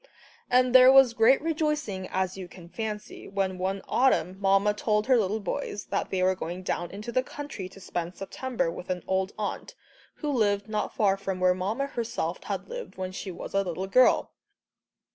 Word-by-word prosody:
And 250 Hz, 0 st, +4 dB
there 255 Hz, 0 st, +9 dB
was 270 Hz, -3 st, +7 dB
great 230 Hz, +4 st, +5 dB
rejoicing, 300 Hz, -, -1 dB
as 185 Hz, 0 st, -1 dB
you 190 Hz, -2 st, -7 dB
can 175 Hz, -1 st, -13 dB
fancy, 215 Hz, +1 st, -6 dB
when 190 Hz, -2 st, -2 dB
one 190 Hz, +1 st, -2 dB
autumn 190 Hz, -9 st, +2 dB
Mamma 195 Hz, +1 st, +3 dB
told 210 Hz, 0 st, 0 dB
her 260 Hz, -, +4 dB
little 215 Hz, -1 st, +1 dB
boys 210 Hz, -1 st, -4 dB
that -, -, -1 dB
they 185 Hz, -1 st, 0 dB
were 185 Hz, +1 st, +4 dB
going 180 Hz, 0 st, -6 dB
down 175 Hz, -1 st, -2 dB
into 210 Hz, +4 st, -7 dB
the 255 Hz, -, +2 dB
country 265 Hz, -8 st, -7 dB
to 195 Hz, -, -14 dB
spend 175 Hz, -1 st, -4 dB
September 235 Hz, -1 st, -2 dB
with 180 Hz, +2 st, -9 dB
an 180 Hz, -1 st, -2 dB
old 190 Hz, +1 st, 0 dB
aunt, 215 Hz, -, -4 dB, 0.4 s
who 295 Hz, -, -3 dB
lived 205 Hz, -5 st, +1 dB
not 215 Hz, -1 st, -2 dB
far 195 Hz, -3 st, +3 dB
from 195 Hz, -1 st, -4 dB
where 185 Hz, 0 st, +4 dB
Mamma 205 Hz, +9 st, -2 dB
herself 235 Hz, -5 st, -3 dB
had -, -, -4 dB
lived -, -, -7 dB
when 185 Hz, 0 st, -4 dB
she 190 Hz, +1 st, -6 dB
"was 175 Hz, -, -7 dB
a 195 Hz, -, +3 dB
little 185 Hz, 0 st, -3 dB
girl." 250 Hz, +7 st, +4 dB
200 Hz, 190 wpm, -27 LUFS, 185-245 Hz, 0.4 s, there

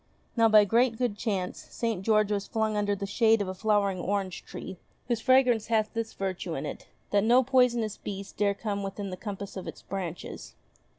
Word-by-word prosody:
Now, 230 Hz, -2 st, +5 dB
by 215 Hz, -1 st, +7 dB
great 230 Hz, +2 st, +2 dB
good 245 Hz, -4 st, 0 dB
chance, 195 Hz, -5 st, -3 dB
St. 225 Hz, -5 st, -2 dB
George 215 Hz, 0 st, +2 dB
was 200 Hz, -1 st, -1 dB
flung 220 Hz, -1 st, 0 dB
under 205 Hz, -1 st, +1 dB
the 200 Hz, 0 st, -4 dB
shade 225 Hz, +2 st, +3 dB
of 200 Hz, -, -1 dB
a 185 Hz, -, -3 dB
flowering 200 Hz, -1 st, +1 dB
orange 190 Hz, 0 st, -2 dB
tree, 185 Hz, -, -8 dB, 0.3 s
whose 235 Hz, -2 st, 0 dB
fragrance 250 Hz, -4 st, +4 dB
hath 220 Hz, -2 st, +1 dB
this 230 Hz, -1 st, -3 dB
virtue 190 Hz, -2 st, -3 dB
in -, -, -4 dB
it, -, -, -7 dB, 0.2 s
that 200 Hz, -1 st, +3 dB
no 245 Hz, +4 st, +5 dB
poisonous 240 Hz, -4 st, +2 dB
beast 195 Hz, -1 st, -7 dB
dare 200 Hz, -1 st, +1 dB
come 200 Hz, -1 st, -3 dB
within 195 Hz, 0 st, -5 dB
the -, -, -4 dB
compass 200 Hz, 0 st, -6 dB
of 190 Hz, -, -6 dB
its -, -, -8 dB
branches. 185 Hz, -4 st, -6 dB
210 Hz, 195 wpm, -28 LUFS, 195-230 Hz, 0.3 s, by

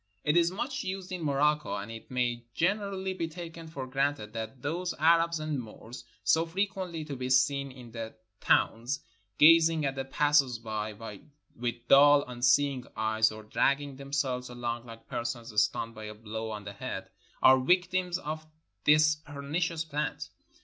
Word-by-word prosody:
It 150 Hz, +1 st, +2 dB
is 170 Hz, -1 st, +5 dB
much 255 Hz, +8 st, -3 dB
used 190 Hz, 0 st, -5 dB
in 180 Hz, -2 st, -4 dB
Morocco, 150 Hz, +1 st, +1 dB
and 100 Hz, +2 st, -5 dB
it 115 Hz, 0 st, -10 dB
may 120 Hz, -2 st, -1 dB
gen 195 Hz, +6 st, +2 dB
erally 190 Hz, -2 st, -4 dB
be 165 Hz, -3 st, -2 dB
taken 165 Hz, 0 st, -8 dB
for 140 Hz, -5 st, -6 dB
granted 135 Hz, -4 st, -1 dB
that 115 Hz, +3 st, -6 dB
those 175 Hz, +5 st, -2 dB
Arabs 165 Hz, +1 st, +4 dB
and 155 Hz, -2 st, -2 dB
Moors, 115 Hz, +2 st, -11 dB, 0.2 s
so 160 Hz, +11 st, +4 dB
frequently 185 Hz, -3 st, -3 dB
to 145 Hz, -2 st, -5 dB
be 130 Hz, 0 st, -4 dB
seen 140 Hz, +1 st, +2 dB
in 125 Hz, -3 st, -12 dB
the 115 Hz, -1 st, -6 dB, 0.2 s
towns, 120 Hz, +6 st, +1 dB, 0.4 s
gazing 165 Hz, 0 st, +6 dB
at 135 Hz, -, 0 dB
the 135 Hz, 0 st, -3 dB
passers 135 Hz, -2 st, +2 dB
by 110 Hz, -1 st, -4 dB, 0.6 s
with 120 Hz, 0 st, -4 dB
dull, 145 Hz, +1 st, +7 dB
unseeing 125 Hz, +2 st, +2 dB
eyes, 110 Hz, 0 st, +2 dB
or 110 Hz, 0 st, -9 dB
dragging 140 Hz, +5 st, 0 dB
them 140 Hz, 0 st, -10 dB
selves 130 Hz, -3 st, -1 dB
along 120 Hz, -1 st, -4 dB
like 115 Hz, 0 st, -11 dB
persons 120 Hz, -1 st, -4 dB
stunned 115 Hz, +2 st, -1 dB
by 110 Hz, -1 st, -9 dB
a 105 Hz, 0 st, -7 dB
blow 110 Hz, +1 st, -5 dB
on 105 Hz, -2 st, -6 dB
the 100 Hz, 0 st, -7 dB
head, 95 Hz, -4 st, -6 dB, 0.3 s
are 130 Hz, 0 st, +8 dB
victims 180 Hz, +4 st, +1 dB
of 155 Hz, -2 st, -6 dB, 0.4 s
this 155 Hz, +1 st, +5 dB
pernicious 155 Hz, +3 st, -3 dB
plant. 150 Hz, -1 st, -3 dB
140 Hz, 165 wpm, -29 LUFS, 120-160 Hz, 0.6 s, are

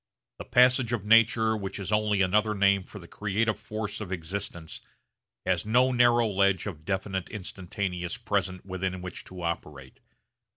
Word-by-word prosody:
The -, -, -7 dB
passage 125 Hz, 0 st, +4 dB
of 105 Hz, -4 st, -2 dB
nature 110 Hz, 0 st, +4 dB
which 100 Hz, -3 st, -5 dB
is 100 Hz, 0 st, -5 dB
only 105 Hz, -2 st, +2 dB
another 105 Hz, +3 st, +2 dB
name 100 Hz, -1 st, +3 dB
for -, -, -11 dB
the 85 Hz, -4 st, -11 dB
creative 105 Hz, +3 st, -1 dB
force 110 Hz, 0 st, -5 dB
of 100 Hz, -4 st, -6 dB
existence 85 Hz, -1 st, -5 dB, 0.6 s
has 90 Hz, -3 st, +1 dB
no 125 Hz, +4 st, +3 dB
narrow 120 Hz, -1 st, +4 dB
ledge 100 Hz, -2 st, +2 dB
of 80 Hz, -7 st, -7 dB
definite 95 Hz, 0 st, -2 dB
instantaneous 90 Hz, -2 st, -4 dB
present 95 Hz, -6 st, -2 dB
within 95 Hz, -1 st, -4 dB
which 90 Hz, -2 st, -7 dB
to 90 Hz, -1 st, -9 dB
operate. 75 Hz, -5 st, -5 dB
100 Hz, 155 wpm, -27 LUFS, 90-110 Hz, 0.6 s, passage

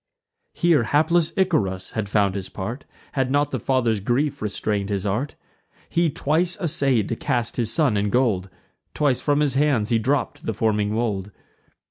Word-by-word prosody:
Here 170 Hz, -6 st, +3 dB
hapless 160 Hz, +7 st, +2 dB
Icarus 95 Hz, -, 0 dB
had 110 Hz, -3 st, -3 dB
found 100 Hz, -2 st, +2 dB
his 95 Hz, -1 st, -5 dB
part, 115 Hz, +8 st, -6 dB, 0.3 s
Had 135 Hz, -2 st, 0 dB
not 145 Hz, +1 st, +1 dB
the 130 Hz, -, -2 dB
father's 120 Hz, -3 st, +1 dB
grief 140 Hz, +7 st, -1 dB
restrain'd 105 Hz, -1 st, -2 dB
his 100 Hz, -1 st, -2 dB
art. 115 Hz, +9 st, -2 dB, 0.5 s
He 170 Hz, -1 st, +2 dB
twice 160 Hz, +5 st, 0 dB
assay'd 140 Hz, -, +1 dB
to -, -, -1 dB
cast 125 Hz, -8 st, -1 dB
his 115 Hz, -3 st, +1 dB
son 140 Hz, -5 st, +2 dB
in 100 Hz, 0 st, 0 dB
gold; 105 Hz, -6 st, +1 dB, 0.5 s
Twice 140 Hz, -4 st, +1 dB
from 145 Hz, 0 st, +1 dB
his 145 Hz, -3 st, +1 dB
hands 135 Hz, -6 st, +2 dB
he 115 Hz, -, +2 dB
dropp'd 135 Hz, +5 st, -1 dB
the 110 Hz, -, -1 dB
forming 105 Hz, -1 st, +1 dB
mould. 105 Hz, -4 st, -1 dB
120 Hz, 165 wpm, -23 LUFS, 105-145 Hz, 0.5 s, Here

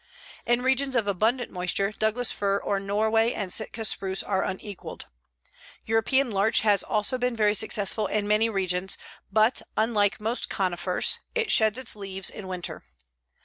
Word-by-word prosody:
In 240 Hz, +1 st, +2 dB
regions 265 Hz, +1 st, +1 dB
of 230 Hz, -3 st, +2 dB
abundant 220 Hz, +5 st, 0 dB
moisture 185 Hz, +2 st, -1 dB
Douglas 220 Hz, +3 st, +1 dB
fir 200 Hz, -1 st, 0 dB
or 200 Hz, 0 st, -1 dB
Norway 220 Hz, +4 st, +1 dB
and 190 Hz, -3 st, -2 dB
Sitka 225 Hz, 0 st, -1 dB
spruce 190 Hz, -2 st, 0 dB
are 190 Hz, -2 st, 0 dB
unequaled. 190 Hz, +1 st, -6 dB, 0.8 s
European 230 Hz, +4 st, +1 dB
larch 200 Hz, +2 st, +2 dB
has 205 Hz, -3 st, +3 dB
also 220 Hz, +4 st, -1 dB
been 250 Hz, -1 st, 0 dB
very 210 Hz, -2 st, +3 dB
successful 210 Hz, 0 st, +1 dB
in 210 Hz, 0 st, -1 dB
many 215 Hz, +2 st, +3 dB
regions, 190 Hz, -2 st, -1 dB, 0.3 s
but, 220 Hz, +4 st, +3 dB, 0.2 s
unlike 215 Hz, -2 st, +2 dB
most 225 Hz, +3 st, -2 dB
conifers, 180 Hz, -2 st, 0 dB, 0.2 s
it 455 Hz, -2 st, +1 dB
sheds 220 Hz, +1 st, +4 dB
its 260 Hz, -4 st, -1 dB
leaves 195 Hz, -2 st, -2 dB
in 200 Hz, -, -9 dB
winter. 180 Hz, -2 st, -4 dB
210 Hz, 150 wpm, -26 LUFS, 195-225 Hz, 0.8 s, sheds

